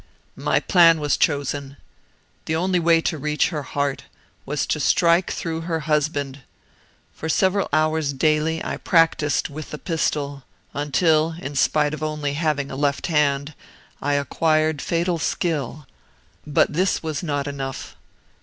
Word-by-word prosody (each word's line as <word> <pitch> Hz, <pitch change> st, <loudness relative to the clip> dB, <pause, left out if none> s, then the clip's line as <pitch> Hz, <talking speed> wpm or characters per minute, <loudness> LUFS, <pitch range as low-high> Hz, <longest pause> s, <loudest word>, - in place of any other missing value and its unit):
"My -, -, +2 dB
plan 170 Hz, -3 st, +5 dB
was 145 Hz, -2 st, +1 dB
chosen. 140 Hz, -1 st, -1 dB, 0.7 s
The 160 Hz, -, -1 dB
only 180 Hz, +2 st, +1 dB
way 165 Hz, -1 st, +4 dB
to 160 Hz, -1 st, -2 dB
reach 150 Hz, +1 st, +1 dB
her 155 Hz, -4 st, -3 dB
heart 140 Hz, 0 st, -2 dB, 0.4 s
was -, -, -1 dB
to -, -, -1 dB
strike 170 Hz, +1 st, +3 dB
through 165 Hz, -2 st, -3 dB
her 165 Hz, -1 st, -2 dB
husband. 145 Hz, -2 st, -1 dB, 0.7 s
For 160 Hz, -, -6 dB
several 190 Hz, +3 st, +2 dB
hours 155 Hz, -1 st, +1 dB
daily 155 Hz, +3 st, +1 dB
I -, -, -3 dB
practised 165 Hz, -4 st, +2 dB
with 150 Hz, +1 st, -8 dB
the 150 Hz, -, -6 dB
pistol, 150 Hz, -4 st, -2 dB, 0.3 s
until 155 Hz, +2 st, +2 dB
in 145 Hz, -4 st, -6 dB
spite 150 Hz, +2 st, +2 dB
of 155 Hz, -, -6 dB
only 150 Hz, -2 st, -2 dB
having 150 Hz, -2 st, -1 dB
a -, -, -5 dB
left 140 Hz, 0 st, 0 dB
hand 145 Hz, 0 st, +1 dB, 0.5 s
I 145 Hz, +1 st, 0 dB
acquired 155 Hz, +1 st, +1 dB
fatal 170 Hz, 0 st, 0 dB
skill. 150 Hz, -3 st, -2 dB, 0.6 s
But 150 Hz, 0 st, +2 dB
this 185 Hz, +3 st, +1 dB
was 155 Hz, -3 st, -3 dB
not 145 Hz, -5 st, -2 dB
enough. 135 Hz, -2 st, -6 dB
155 Hz, 145 wpm, -22 LUFS, 145-165 Hz, 0.7 s, plan